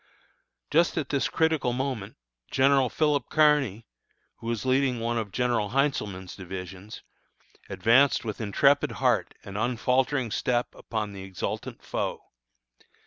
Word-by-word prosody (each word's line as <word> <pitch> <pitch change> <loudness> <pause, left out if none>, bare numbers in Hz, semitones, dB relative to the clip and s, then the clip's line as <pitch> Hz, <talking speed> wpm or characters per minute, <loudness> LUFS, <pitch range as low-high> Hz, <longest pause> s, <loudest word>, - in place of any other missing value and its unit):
Just 170 +3 +3
at 150 -5 -2
this 140 -2 0
critical 160 -6 +1
moment, 125 -6 -3 0.3
General 135 -1 +3
Philip 150 -2 +1
Kearny, 145 -9 +3 0.5
who 115 - -9
was 115 +1 -2
leading 130 -1 +2
one 115 0 -1
of 105 -3 -5
General 120 -2 0
Heintzelman's 105 -10 -1
divisions, 95 +2 -8 0.7
advanced 125 +3 +3
with 110 0 -4
intrepid 140 +7 +3
heart - - +1
and 100 +1 -6
unfaltering 125 +2 +1
step 120 +2 0
upon 105 -3 -4
the 100 - -8
exultant 95 -1 -5
foe. - - -3
120 Hz, 125 wpm, -27 LUFS, 105-140 Hz, 0.7 s, Just